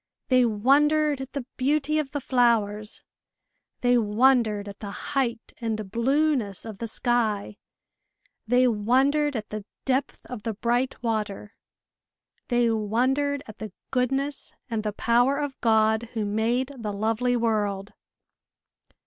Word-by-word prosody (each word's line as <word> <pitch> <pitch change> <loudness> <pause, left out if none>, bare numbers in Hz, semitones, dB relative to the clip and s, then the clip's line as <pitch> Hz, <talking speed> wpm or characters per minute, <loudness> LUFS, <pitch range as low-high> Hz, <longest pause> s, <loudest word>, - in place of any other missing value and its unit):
They 255 -1 +5
wondered 285 +6 +3
at 265 - -8
the 280 -4 -4
beauty 300 +3 +1
of 295 -3 -2
the 290 - -3
flowers; 225 -5 +1 0.8
they 245 0 +4
wondered 220 -1 +2
at 200 0 -9
the 205 - -6 0.2
height 245 -4 -1
and 215 -4 -3
blueness 250 -3 +1
of 215 -3 -8
the 230 - -3
sky; 220 -3 0 0.9
they 250 +2 +4
wondered 265 +7 +2
at 215 -2 -4
the 215 -1 -5 0.2
depth 265 +1 -1
of 250 -4 -7
the 225 -1 -3
bright 240 +3 -1
water; 210 -2 -3 0.9
they 240 -2 +2
wondered 260 +7 0
at 215 - -12
the 215 -3 -7 0.2
goodness 270 +2 0 0.2
and 225 -1 0
the 210 0 -2
power 245 +6 +2
of 290 -2 -4
God 220 0 +2
who 220 -3 -1
made 230 +6 0
the 210 -3 -4
lovely 225 +4 0
world. 210 -3 -1
235 Hz, 130 wpm, -25 LUFS, 215-265 Hz, 0.9 s, They